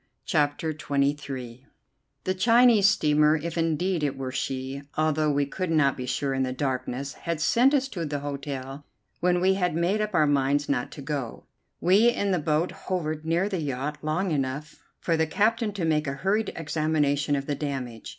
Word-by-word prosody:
CHAPTER 150 Hz, -1 st, +1 dB
XXIII 140 Hz, -4 st, -2 dB, 0.6 s
The 185 Hz, -, 0 dB
Chinese 230 Hz, 0 st, +5 dB
steamer, 150 Hz, -5 st, +3 dB
if 165 Hz, +2 st, -4 dB
indeed 165 Hz, +2 st, 0 dB
it 140 Hz, -2 st, -1 dB
were 130 Hz, -1 st, -4 dB
she, 135 Hz, +1 st, -3 dB, 0.2 s
although 155 Hz, 0 st, +2 dB
we 145 Hz, -1 st, +1 dB
could 185 Hz, +5 st, -4 dB
not 155 Hz, -4 st, +3 dB
be 125 Hz, -1 st, -6 dB
sure 135 Hz, +2 st, -1 dB
in 135 Hz, -, -1 dB
the 130 Hz, -1 st, 0 dB
darkness, 130 Hz, 0 st, -3 dB
had 170 Hz, -2 st, -4 dB
sent 245 Hz, -, +4 dB
us 270 Hz, -1 st, +1 dB
to 175 Hz, -8 st, -4 dB
the 145 Hz, -2 st, -3 dB
hotel 140 Hz, -1 st, -5 dB, 0.4 s
when 180 Hz, 0 st, +2 dB
we 190 Hz, +2 st, +3 dB
had 180 Hz, -4 st, 0 dB
made 180 Hz, +6 st, +1 dB
up 210 Hz, -2 st, -2 dB
our 155 Hz, -, +5 dB
minds 145 Hz, 0 st, +1 dB
not 125 Hz, -3 st, -1 dB
to 140 Hz, -, -9 dB
go. 135 Hz, -4 st, -4 dB, 0.3 s
We 200 Hz, +6 st, +5 dB
in 200 Hz, -4 st, 0 dB
the 180 Hz, -, +2 dB
boat 155 Hz, +3 st, 0 dB, 0.2 s
hovered 155 Hz, -4 st, -2 dB
near 170 Hz, +4 st, +2 dB
the 190 Hz, -5 st, -2 dB
yacht 145 Hz, +1 st, -3 dB
long 165 Hz, +5 st, -1 dB
enough 145 Hz, +1 st, -3 dB, 0.2 s
for 165 Hz, -, 0 dB
the 160 Hz, 0 st, +1 dB
captain 220 Hz, +5 st, +1 dB
to 190 Hz, -5 st, -2 dB
make 150 Hz, -2 st, +1 dB
a 135 Hz, -, -1 dB
hurried 195 Hz, +9 st, 0 dB
examination 150 Hz, -2 st, 0 dB
of 140 Hz, 0 st, -3 dB
the 145 Hz, -, -1 dB
damage. 135 Hz, -6 st, -5 dB
150 Hz, 185 wpm, -26 LUFS, 140-180 Hz, 0.6 s, Chinese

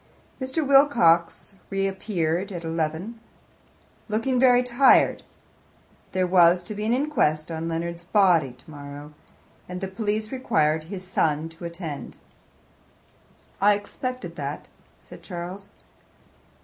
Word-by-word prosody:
Mr. 265 Hz, +3 st, -1 dB
Wilcox 230 Hz, -, +4 dB, 0.2 s
reappeared 195 Hz, -2 st, -1 dB
at 175 Hz, -2 st, -6 dB
eleven, 165 Hz, +7 st, -3 dB, 0.9 s
looking 245 Hz, +4 st, 0 dB
very 250 Hz, -1 st, +5 dB
tired. 250 Hz, +2 st, +4 dB, 0.9 s
There 185 Hz, 0 st, +1 dB
was 175 Hz, -1 st, +5 dB
to 195 Hz, -, -7 dB
be 210 Hz, +1 st, -3 dB
an -, -, +1 dB
inquest 170 Hz, -, 0 dB
on 165 Hz, 0 st, -3 dB
Leonard's' 170 Hz, +1 st, -4 dB
body 175 Hz, -, +3 dB
tomorrow, 145 Hz, +2 st, -11 dB, 0.6 s
and 180 Hz, 0 st, -5 dB
the 190 Hz, -, -3 dB
police 215 Hz, +2 st, -2 dB
required 155 Hz, -, +1 dB
his 185 Hz, +1 st, -7 dB
son 160 Hz, -3 st, 0 dB
to 165 Hz, +1 st, -10 dB
attend. 170 Hz, -4 st, -7 dB, 1.4 s
"I 205 Hz, +1 st, +5 dB
expected 255 Hz, +5 st, -6 dB
that," -, -, -5 dB, 0.3 s
said -, -, -12 dB
Charles. 185 Hz, +2 st, -7 dB
185 Hz, 110 wpm, -25 LUFS, 165-215 Hz, 1.4 s, very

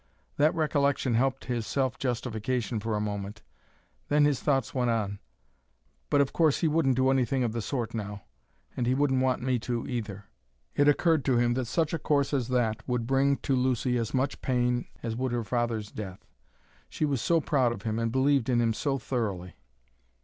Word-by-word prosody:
That 155 Hz, +4 st, +3 dB
recollection 140 Hz, -5 st, +1 dB
helped 135 Hz, +3 st, +1 dB
his 120 Hz, -3 st, -2 dB
self 130 Hz, -3 st, 0 dB
justification 120 Hz, -1 st, -2 dB
for 110 Hz, +1 st, -2 dB
a -, -, 0 dB
moment, 105 Hz, 0 st, -4 dB, 0.6 s
then 145 Hz, 0 st, +4 dB
his 145 Hz, -3 st, +1 dB
thoughts 135 Hz, -5 st, 0 dB
went 125 Hz, -2 st, +1 dB
on: 105 Hz, -3 st, -1 dB, 0.9 s
"But 145 Hz, -, +4 dB
of 140 Hz, -, 0 dB
course 160 Hz, -4 st, +2 dB
he 165 Hz, -, +3 dB
wouldn't 150 Hz, -4 st, +2 dB
do 130 Hz, +1 st, +3 dB
anything 130 Hz, 0 st, +1 dB
of 115 Hz, -2 st, -1 dB
the 115 Hz, -, -2 dB
sort 120 Hz, 0 st, -3 dB
now; 105 Hz, -3 st, -5 dB, 0.5 s
and 120 Hz, -, -1 dB
he 130 Hz, -, +2 dB
wouldn't 135 Hz, -2 st, +2 dB
want 130 Hz, -2 st, +1 dB
me 130 Hz, -1 st, +1 dB
to, 120 Hz, +1 st, -3 dB
either." 105 Hz, -5 st, -5 dB, 0.5 s
It 145 Hz, -, +3 dB
occurred 155 Hz, 0 st, +3 dB
to 130 Hz, -3 st, +3 dB
him 120 Hz, 0 st, +3 dB
that 130 Hz, 0 st, -1 dB
such 160 Hz, +7 st, 0 dB
a 165 Hz, -, -1 dB
course 145 Hz, -1 st, +1 dB
as 130 Hz, -4 st, 0 dB
that 120 Hz, -4 st, +1 dB
would 125 Hz, -2 st, 0 dB
bring 135 Hz, +2 st, +2 dB
to 135 Hz, -, +2 dB
Lucy 125 Hz, -1 st, +1 dB
as 115 Hz, -1 st, -2 dB
much 135 Hz, +1 st, -1 dB
pain 125 Hz, -1 st, 0 dB, 0.2 s
as 115 Hz, -1 st, -2 dB
would 130 Hz, +1 st, -2 dB
her 120 Hz, -1 st, -1 dB
father's 115 Hz, -2 st, -2 dB
death. 95 Hz, -4 st, -8 dB, 0.6 s
She 155 Hz, -, -1 dB
was 140 Hz, -5 st, -1 dB
so 170 Hz, -1 st, +3 dB
proud 135 Hz, -6 st, +1 dB
of 105 Hz, -4 st, -6 dB
him 110 Hz, 0 st, -1 dB
and 115 Hz, 0 st, 0 dB
believed 135 Hz, 0 st, +2 dB
in 120 Hz, -2 st, +3 dB
him 115 Hz, -1 st, +2 dB
so 135 Hz, +4 st, -1 dB
thoroughly. 105 Hz, -8 st, -3 dB
125 Hz, 195 wpm, -28 LUFS, 115-135 Hz, 0.9 s, then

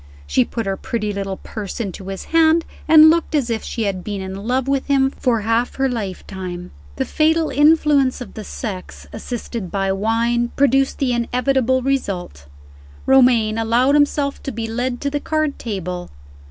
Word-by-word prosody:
She 70 Hz, -, +2 dB
put 230 Hz, -, -4 dB
her 195 Hz, 0 st, -1 dB
pretty 210 Hz, -2 st, -3 dB
little 195 Hz, -1 st, -4 dB
purse 210 Hz, -1 st, -7 dB
into 195 Hz, -3 st, -5 dB
his 195 Hz, -1 st, -5 dB
hand, 325 Hz, 0 st, +4 dB, 0.2 s
and 315 Hz, 0 st, +8 dB
looked 330 Hz, -1 st, 0 dB
as 255 Hz, -5 st, 0 dB
if 225 Hz, -, -2 dB
she 230 Hz, -, -3 dB
had 195 Hz, -3 st, -2 dB
been 205 Hz, -2 st, -4 dB
in 190 Hz, +2 st, -6 dB
love 255 Hz, +1 st, 0 dB
with 275 Hz, -1 st, 0 dB
him 270 Hz, -1 st, +3 dB
for 235 Hz, -5 st, 0 dB
half 230 Hz, +3 st, 0 dB
her 270 Hz, 0 st, +1 dB
lifetime. 190 Hz, -5 st, -5 dB, 0.2 s
The -, -, -1 dB
fatal 320 Hz, +1 st, +1 dB
influence 295 Hz, -3 st, +3 dB
of 250 Hz, -, -9 dB
the 215 Hz, -, -7 dB
sex, 195 Hz, -2 st, -7 dB
assisted 230 Hz, -3 st, -5 dB
by 195 Hz, 0 st, -1 dB
wine, 230 Hz, +4 st, 0 dB
produced 270 Hz, 0 st, +2 dB
the 260 Hz, -3 st, 0 dB
inevitable 255 Hz, +2 st, +1 dB
result. 190 Hz, -, -3 dB, 0.6 s
Romayne 240 Hz, -5 st, +4 dB
allowed 235 Hz, +5 st, +2 dB
himself 290 Hz, -1 st, +1 dB
to 275 Hz, -, -5 dB
be 225 Hz, -1 st, -4 dB
led 245 Hz, +2 st, -3 dB
to 280 Hz, -, -1 dB
the 290 Hz, -, -1 dB
card 310 Hz, -1 st, -1 dB
table. 180 Hz, -5 st, -5 dB
235 Hz, 170 wpm, -20 LUFS, 200-275 Hz, 0.6 s, and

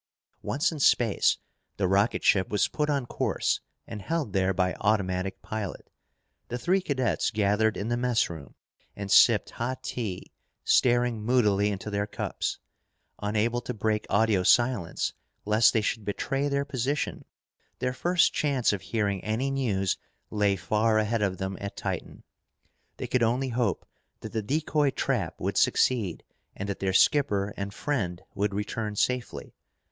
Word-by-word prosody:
Once 150 Hz, +6 st, 0 dB
in 160 Hz, -, -6 dB
space, 120 Hz, -6 st, +3 dB, 0.4 s
the 95 Hz, -, +1 dB
rocket 100 Hz, +4 st, +2 dB
ship 95 Hz, -2 st, +3 dB
was 105 Hz, -, +2 dB
put 150 Hz, -1 st, -2 dB
on 140 Hz, -4 st, 0 dB
course -, -, 0 dB, 0.3 s
and 105 Hz, -2 st, -7 dB
held 155 Hz, -, -2 dB
there 95 Hz, -1 st, +2 dB
by 90 Hz, 0 st, +1 dB
automatic 95 Hz, -3 st, 0 dB
pilot. 110 Hz, -3 st, -5 dB, 0.6 s
The 120 Hz, -, -3 dB
three 185 Hz, +9 st, +1 dB
cadets 130 Hz, -8 st, 0 dB
gathered 105 Hz, +1 st, +1 dB
in 105 Hz, +3 st, -3 dB
the 120 Hz, -, 0 dB
messroom 105 Hz, -, -1 dB, 0.4 s
and 100 Hz, -1 st, -5 dB
sipped 110 Hz, 0 st, +6 dB
hot 125 Hz, +2 st, -4 dB
tea, 105 Hz, -7 st, -5 dB, 0.3 s
staring 120 Hz, -2 st, +3 dB
moodily 105 Hz, -4 st, +2 dB
into 105 Hz, +1 st, -4 dB
their 100 Hz, 0 st, -1 dB
cups. -, -, -3 dB, 0.6 s
Unable 110 Hz, +4 st, 0 dB
to 125 Hz, -, -5 dB
break 110 Hz, 0 st, -1 dB
audio 110 Hz, -2 st, +3 dB
silence, 120 Hz, -3 st, +2 dB, 0.3 s
lest 110 Hz, +2 st, +5 dB
they 110 Hz, -, +1 dB
should 110 Hz, +1 st, -2 dB
betray 135 Hz, +7 st, -1 dB
their 140 Hz, 0 st, 0 dB
position, 140 Hz, +1 st, -2 dB, 0.5 s
their 125 Hz, 0 st, -1 dB
first 175 Hz, +7 st, +2 dB
chance 135 Hz, -7 st, +1 dB
of 100 Hz, -, -3 dB
hearing 100 Hz, -4 st, -1 dB
any 115 Hz, +6 st, -1 dB
news 105 Hz, -9 st, 0 dB, 0.3 s
lay 105 Hz, -2 st, +2 dB
far 105 Hz, +5 st, +1 dB
ahead 110 Hz, +1 st, +1 dB
of 95 Hz, -2 st, 0 dB
them 95 Hz, 0 st, -4 dB
at 100 Hz, 0 st, -6 dB
Titan. -, -, -5 dB, 0.7 s
They -, -, -4 dB
could 125 Hz, -, 0 dB
only 125 Hz, +3 st, +1 dB
hope 115 Hz, -7 st, -1 dB, 0.4 s
that -, -, -7 dB
the 110 Hz, -, -1 dB
decoy 150 Hz, +4 st, +1 dB
trap 120 Hz, -, -2 dB
would -, -, -2 dB
succeed 110 Hz, -9 st, +2 dB, 0.3 s
and 100 Hz, -, -5 dB
that 100 Hz, -, -4 dB
their 95 Hz, -1 st, 0 dB
skipper 100 Hz, -3 st, +3 dB
and 100 Hz, 0 st, -4 dB
friend 100 Hz, -8 st, -2 dB
would 100 Hz, 0 st, -1 dB
return 105 Hz, +1 st, -3 dB
safely. 125 Hz, +3 st, -2 dB
110 Hz, 150 wpm, -27 LUFS, 100-125 Hz, 0.7 s, sipped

